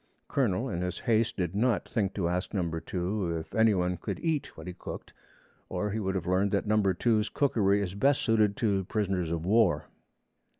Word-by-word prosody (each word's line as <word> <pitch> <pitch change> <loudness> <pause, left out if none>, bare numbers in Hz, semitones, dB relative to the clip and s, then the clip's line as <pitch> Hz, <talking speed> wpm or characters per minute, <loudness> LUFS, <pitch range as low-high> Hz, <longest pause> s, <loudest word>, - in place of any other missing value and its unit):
Colonel 120 -2 0
in 90 -8 -3
his 90 0 -2
haste 115 -1 +1
did 90 -2 -1
not 115 +1 +1
think 100 -4 -1
to 90 -4 0
ask 90 +4 -2
Number 85 -4 -1
2 90 0 -2
if 80 - -8
any 110 -2 +4
one 90 -1 0
could - - -5
eat 160 -3 -2
what - - -9
he 90 - -5
cooked, 90 - -8 0.6
or 105 0 -2
he 110 - -2
would 95 -2 -2
have 90 -3 -2
learned 95 +3 +2
that 100 - +1
Number 105 -3 +2
2's 110 +1 +1
cookery 105 -8 +2
is 90 -2 -4
best 135 +8 +2
suited 110 -3 +2
to 100 -4 +1
prisoners 95 -5 -1
of 85 0 -2
war. 95 -7 +3
100 Hz, 200 wpm, -29 LUFS, 90-110 Hz, 0.6 s, any